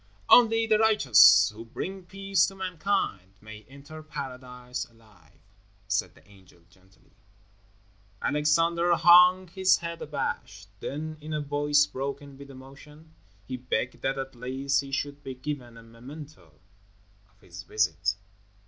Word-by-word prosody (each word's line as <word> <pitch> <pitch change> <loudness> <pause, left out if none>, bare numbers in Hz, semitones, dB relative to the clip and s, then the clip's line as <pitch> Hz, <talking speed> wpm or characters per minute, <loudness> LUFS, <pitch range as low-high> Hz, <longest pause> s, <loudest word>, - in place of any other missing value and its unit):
"Only 225 -2 +6
the 215 -1 +2
righteous 105 - +6
who 110 +2 -10
bring 185 +11 -7
peace 195 0 +1
to 195 - -8
mankind 185 - -3
may 110 0 -12
enter 140 +3 -12
Paradise 125 -4 -7
alive," 110 -8 -24 0.5
said 95 -2 -2
the - - -23
angel, 95 -4 -21
gently. 95 +1 -27 1.1
Alexander 165 +4 +1
hung 180 +2 +6
his 190 +1 +3
head 170 -1 -7
abashed; - - -5
then, 155 +2 -6
in 155 +1 -7
a 150 - -1
voice 145 0 +2
broken 140 0 -6
with 140 +1 -13
emotion, 140 +4 -15 0.3
he 130 - -6
begged 125 0 -3
that 135 0 -1
at 135 0 -5
least 135 +3 -2
he 135 -1 -10
should 145 +1 -4
be 130 - -7
given 130 -3 -7
a 115 - -13
memento 115 - -13 0.7
of 100 0 -33
his 95 -2 -11
visit. 95 -1 -1
140 Hz, 135 wpm, -27 LUFS, 115-160 Hz, 1.1 s, Only